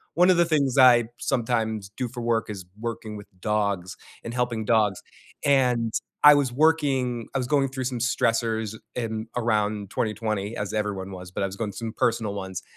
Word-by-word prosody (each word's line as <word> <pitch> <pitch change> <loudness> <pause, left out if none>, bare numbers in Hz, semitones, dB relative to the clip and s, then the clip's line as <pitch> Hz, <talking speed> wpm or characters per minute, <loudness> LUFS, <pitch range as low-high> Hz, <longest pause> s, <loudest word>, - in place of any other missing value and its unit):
One 180 +2 +5
of 180 - +5
the 175 - +5
things 140 -5 +1
I 125 -3 +7
sometimes 110 -5 -1
do 125 - -1
for 120 0 -7
work 115 -2 0
is 95 -4 -6
working 115 -2 -5
with 105 - -11
dogs, 100 -3 -1 0.3
and 115 - -6
helping 120 -3 -1
dogs, 105 -4 +2 0.4
and 125 -5 +2 0.3
I 150 - +11
was 140 -3 +1
working 135 -5 +1
I - - +3
was 125 -2 -2
going 140 -1 +2
through 130 0 -4
some 125 -2 -2
stressors 115 -2 0 0.2
in 110 -2 -3
around 105 -3 0
2020 110 -1 -2
as 100 0 -3
everyone 100 -3 -2
was, 90 -1 -9
but - - -4
I - - +2
was 95 - -8
going 105 0 -3
through 115 +3 -6
some 110 - -5
personal 115 -4 0
ones, 95 -2 -5
115 Hz, 190 wpm, -25 LUFS, 105-125 Hz, 0.4 s, I